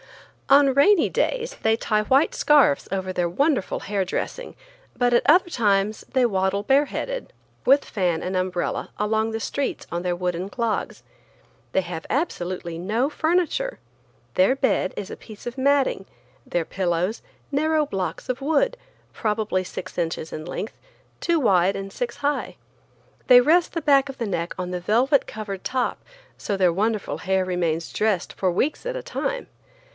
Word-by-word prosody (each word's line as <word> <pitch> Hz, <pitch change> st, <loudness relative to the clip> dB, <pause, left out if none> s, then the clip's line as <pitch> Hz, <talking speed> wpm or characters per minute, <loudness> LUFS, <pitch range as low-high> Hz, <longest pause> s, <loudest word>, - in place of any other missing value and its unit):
On 275 Hz, 0 st, +6 dB
rainy 320 Hz, +6 st, +5 dB
days -, -, -1 dB
they 220 Hz, 0 st, +2 dB
tie 215 Hz, -2 st, +1 dB
white 265 Hz, +8 st, +3 dB
scarfs 290 Hz, -, +4 dB
over 190 Hz, -1 st, -2 dB
their 175 Hz, -1 st, 0 dB
wonderful 275 Hz, -, 0 dB
hair 200 Hz, -1 st, -1 dB
dressing, -, -, -4 dB, 0.4 s
but 245 Hz, -1 st, +2 dB
at 240 Hz, -, +5 dB
other 350 Hz, +4 st, +5 dB
times 210 Hz, -, +1 dB
they 260 Hz, -2 st, +3 dB
waddle 195 Hz, -2 st, 0 dB
bareheaded, 290 Hz, -, 0 dB, 0.3 s
with 275 Hz, +2 st, +5 dB
fan 175 Hz, -5 st, -1 dB
and 185 Hz, +1 st, -3 dB
umbrella, 185 Hz, -1 st, -1 dB
along 220 Hz, +1 st, +1 dB
the 225 Hz, -, -3 dB
streets 275 Hz, +5 st, -3 dB
on 170 Hz, -, -2 dB
their 180 Hz, -1 st, -1 dB
wooden 180 Hz, +1 st, -2 dB
clogs. 230 Hz, 0 st, -2 dB, 0.7 s
They 190 Hz, -, +2 dB
have 175 Hz, -2 st, -6 dB
absolutely 180 Hz, -, -2 dB
no 220 Hz, +9 st, 0 dB
furniture. 355 Hz, +11 st, 0 dB, 0.6 s
Their 190 Hz, +8 st, +4 dB
bed 265 Hz, -8 st, +1 dB
is 200 Hz, -, -5 dB
a -, -, -5 dB
piece 215 Hz, -1 st, -13 dB
of 240 Hz, +2 st, -5 dB
matting, 270 Hz, -6 st, +2 dB, 0.4 s
their 175 Hz, -2 st, -1 dB
pillows, 180 Hz, +3 st, -1 dB, 0.3 s
narrow 305 Hz, +2 st, +2 dB
blocks 195 Hz, -9 st, -4 dB
of 255 Hz, +1 st, -3 dB
wood, 320 Hz, -, +2 dB, 0.4 s
probably 210 Hz, -3 st, -1 dB
six 185 Hz, 0 st, -8 dB
inches 165 Hz, -2 st, -2 dB
in 155 Hz, -, -6 dB
length, 200 Hz, +4 st, -5 dB, 0.5 s
two 340 Hz, -1 st, +2 dB
wide 195 Hz, -, +3 dB
and 195 Hz, 0 st, -6 dB
six 240 Hz, -1 st, -4 dB
high. 290 Hz, 0 st, -2 dB, 0.7 s
They 250 Hz, -1 st, +9 dB
rest 330 Hz, +7 st, +3 dB
the 335 Hz, -, -3 dB
back 280 Hz, -2 st, +4 dB
of 270 Hz, -, -7 dB
the 230 Hz, -, -2 dB
neck 170 Hz, -3 st, -3 dB
on 180 Hz, 0 st, -4 dB
the 180 Hz, -1 st, -3 dB
velvet 250 Hz, -, +2 dB
covered 205 Hz, -3 st, -6 dB
top, 255 Hz, -1 st, -1 dB, 0.3 s
so 200 Hz, -, -2 dB
their 180 Hz, -3 st, +3 dB
wonderful 215 Hz, +2 st, -1 dB
hair 190 Hz, 0 st, 0 dB
remains 170 Hz, -3 st, -1 dB
dressed 210 Hz, -5 st, 0 dB
for 185 Hz, -2 st, 0 dB
weeks 275 Hz, -, -1 dB
at -, -, -2 dB
a -, -, -6 dB
time. -, -, -3 dB
215 Hz, 160 wpm, -24 LUFS, 185-280 Hz, 0.7 s, They